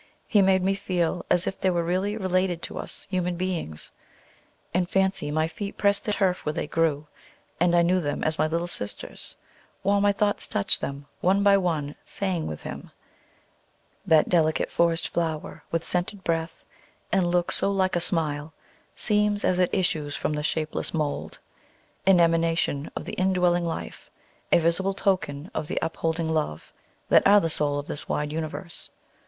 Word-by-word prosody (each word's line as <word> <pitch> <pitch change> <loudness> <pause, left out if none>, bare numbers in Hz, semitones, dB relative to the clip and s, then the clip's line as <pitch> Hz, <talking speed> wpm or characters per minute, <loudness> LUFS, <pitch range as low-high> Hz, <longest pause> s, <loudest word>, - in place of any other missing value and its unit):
He 205 - +4
made 190 -1 +4
me 195 +1 +2
feel 180 -3 -1
as 180 0 +3
if 195 - -4
they 190 - +3
were 175 -2 +1
really 190 +5 -1
related 185 -3 0
to - - -4
us - - -4
human 180 -1 0
beings. 170 - -3 0.8
In 180 0 +1
fancy 190 -5 +1
my 155 +2 +1
feet 200 +3 -6
pressed 200 0 +2
the 210 - 0
turf 185 -3 +1
where 150 - -1
they - - -2
grew, 155 -1 0 0.5
and 175 0 +3
I 170 - +5
knew 180 +2 +3
them 145 -2 -2
as 155 0 0
my - - +3
little 165 +2 -1
sisters, 105 -12 -5 0.5
while 200 +1 +3
my 205 0 +4
thoughts 205 +1 0
touched 100 - 0
them, 140 +1 -5
one 195 +3 +3
by 200 0 +6
one, 160 -7 0
saying 185 -5 -2
with 75 - -6
him, - - -7 1.1
"That 155 -1 +4
delicate 160 -3 +2
forest 170 -1 +2
flower, 160 -3 -3
With 165 0 -1
scented 185 +3 -2
breath, 165 -1 -2 0.5
and 190 -2 +2
look 175 0 +1
so - - +1
like 190 -2 +1
a - - +2
smile, 155 -4 +1 0.4
Seems, 210 -1 +1
as 180 - +2
it 180 - +3
issues 155 -6 0
from - - -1
the 150 - -2
shapeless 155 +2 -2
mould, 150 -2 -2 0.7
An 190 -2 +7
emanation 165 -3 +2
of - - -5
the - - -6
indwelling 180 -2 +2
Life, 165 - -5 0.4
A - - +7
visible 170 +4 +1
token 180 -6 -1
of 155 -1 -3
the - - -4
upholding 165 0 -1
Love, 150 - -3 0.4
That - - +6
are 205 +1 +7
the 165 -4 0
soul 145 -1 +2
of 145 - -4
this 145 - -4
wide 150 0 -1
universe." 160 +2 -5
175 Hz, 175 wpm, -26 LUFS, 155-190 Hz, 1.1 s, An